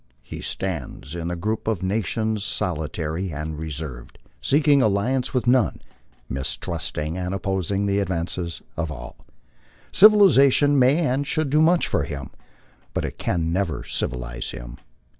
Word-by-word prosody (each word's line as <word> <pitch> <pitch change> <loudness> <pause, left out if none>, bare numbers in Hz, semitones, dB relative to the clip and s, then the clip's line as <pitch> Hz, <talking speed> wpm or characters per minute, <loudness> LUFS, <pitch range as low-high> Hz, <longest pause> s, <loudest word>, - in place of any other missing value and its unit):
He - - -8
stands 85 -5 -4
in 85 -1 -4
the 90 - -2
group 105 +6 -3
of 110 -5 -1
nations 110 +2 -1
solitary 80 0 -2
and 75 +1 -5
reserved, 75 -5 -6 0.2
seeking 145 - +4
alliance 120 +4 +1
with 125 -1 0
none, 120 - +3 0.5
mistrusting 75 +4 -2
and 90 +1 -2
opposing 95 0 -1
the 100 0 +1
advances 85 -2 -3
of 80 -2 -2
all. 60 -4 -8 0.8
Civilization 145 -9 +6
may 140 +6 +4
and 140 +1 0
should 155 -2 0
do 155 +1 +4
much 170 +2 +4
for - - 0
him, 70 -3 -6 0.6
but - - 0
it - - -7
can 85 -1 -1
never 95 -3 -1
civilize 60 -1 -3
him. - - -8
95 Hz, 140 wpm, -23 LUFS, 80-125 Hz, 0.8 s, Civilization